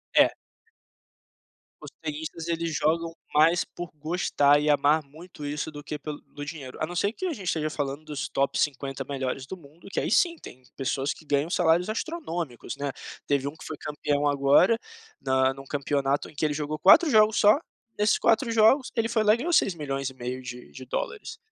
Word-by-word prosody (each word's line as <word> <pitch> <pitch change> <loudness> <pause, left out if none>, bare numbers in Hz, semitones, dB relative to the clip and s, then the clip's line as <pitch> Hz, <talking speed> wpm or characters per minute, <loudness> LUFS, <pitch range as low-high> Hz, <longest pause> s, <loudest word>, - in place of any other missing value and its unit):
É. - - +7 1.5
Os - - -10
tenistas, 160 +1 -5
eles 165 -1 -1
jogam 165 +2 0 0.2
mais 165 +3 +4
por 175 -2 -8
gostar 145 -2 +2
e 150 - -1
amar 150 +2 +3
muito 155 +2 -11
isso 150 +2 -3
do 145 -1 -9
que 150 - -5
pelo 150 0 -6
do 145 - -10
dinheiro, 145 -3 -8
a 155 - 0
não 175 - -7
ser 200 +5 +1
que 375 - -5
a 345 - -1
gente 205 -9 -8
esteja 155 -2 0
falando 145 0 -4
dos 150 -2 -4
top 140 0 0
50 135 -1 -1
melhores 130 -1 -3
do 190 - -7
mundo, 165 0 -17
que - - -1
aí - - -1
sim, 340 - +3
tem 130 - -13
pessoas 135 +1 -1
que - - -16
ganham 145 +2 0
salários 175 0 +3
astronômicos, 175 - -4
né, 140 -1 -2 0.4
teve 140 -1 +1
um 145 - -5
que - - -13
foi 155 - -6
campeão 145 -1 -1
agora, 145 +10 +4 0.4
na 130 0 +2
num 135 0 -11
campeonato 140 0 -1
em - - -18
que 145 - -4
ele 150 - +1
jogou 150 +1 -3
4 305 - +7
jogos 215 -1 +5
só, 210 +6 +6 0.4
nesses 210 0 +3
4 230 +2 +2
jogos 230 +5 +4
ele 230 -1 +1
foi 230 -1 +1
lá 210 0 +5
e - - -5
ganhou 330 +8 -2
seis 195 - +3
milhões 140 -3 -3
e 130 - -14
meio 125 +1 -5
de 125 0 -9
de 130 - -10
dólares, 425 - -4
150 Hz, 200 wpm, -26 LUFS, 140-175 Hz, 1.5 s, É